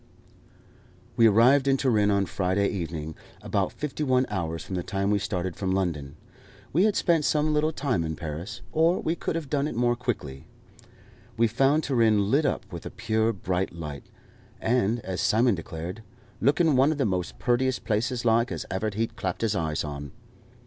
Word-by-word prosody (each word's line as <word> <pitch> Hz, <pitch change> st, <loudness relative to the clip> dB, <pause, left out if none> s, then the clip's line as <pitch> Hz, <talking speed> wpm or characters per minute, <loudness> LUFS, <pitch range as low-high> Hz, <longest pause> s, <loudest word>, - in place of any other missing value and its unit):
We 115 Hz, -, +6 dB
arrived 125 Hz, +6 st, +5 dB
in 135 Hz, 0 st, +4 dB
Turin 110 Hz, -6 st, +2 dB
on 100 Hz, -1 st, +2 dB
Friday 95 Hz, +2 st, 0 dB
evening, 80 Hz, -4 st, -4 dB, 0.3 s
about -, -, 0 dB
fifty 150 Hz, 0 st, -5 dB
one 130 Hz, -2 st, +3 dB
hours 80 Hz, -5 st, -3 dB
from -, -, -8 dB
the 90 Hz, -, -1 dB
time 100 Hz, +3 st, -1 dB
we 105 Hz, -, +2 dB
started 95 Hz, -3 st, -3 dB
from 95 Hz, -1 st, -1 dB
London. 80 Hz, -8 st, -2 dB, 0.6 s
We 175 Hz, +7 st, +4 dB
had 215 Hz, -2 st, +2 dB
spent 165 Hz, -3 st, +2 dB
some 150 Hz, +1 st, +2 dB
little 150 Hz, +1 st, +2 dB
time 130 Hz, -, -1 dB
in 80 Hz, -1 st, -3 dB
Paris, 85 Hz, +9 st, -6 dB
or 165 Hz, +3 st, +3 dB
we 160 Hz, -, 0 dB
could 170 Hz, -, -3 dB
have 165 Hz, -3 st, -3 dB
done 140 Hz, +1 st, 0 dB
it 150 Hz, -, -5 dB
more 120 Hz, +1 st, +2 dB
quickly. 100 Hz, -, -4 dB, 0.9 s
We 115 Hz, -, +4 dB
found 135 Hz, +7 st, +2 dB
Turin 110 Hz, -6 st, +2 dB
lit 145 Hz, +2 st, +3 dB
up -, -, -2 dB
with -, -, -6 dB
a -, -, -5 dB
pure 110 Hz, 0 st, 0 dB
bright 95 Hz, -3 st, -2 dB
light, 75 Hz, -4 st, -7 dB, 0.5 s
and, 115 Hz, -1 st, +1 dB
as 95 Hz, -3 st, -4 dB
Simon 110 Hz, +5 st, +3 dB
declared, 85 Hz, +3 st, -6 dB, 0.4 s
"looking 150 Hz, +2 st, +3 dB
one 135 Hz, +4 st, +4 dB
of 155 Hz, -, -2 dB
the 135 Hz, -, +1 dB
most 90 Hz, -3 st, -2 dB
purtiest 125 Hz, +1 st, 0 dB
places 115 Hz, +3 st, -1 dB
like, 115 Hz, +1 st, +3 dB
as -, -, -4 dB
ever 100 Hz, +3 st, -1 dB
he'd 115 Hz, +2 st, -2 dB
clapped 95 Hz, -3 st, -3 dB
his 110 Hz, -2 st, +1 dB
eyes 80 Hz, -4 st, -1 dB
on." 70 Hz, 0 st, -6 dB
110 Hz, 185 wpm, -26 LUFS, 90-130 Hz, 0.9 s, We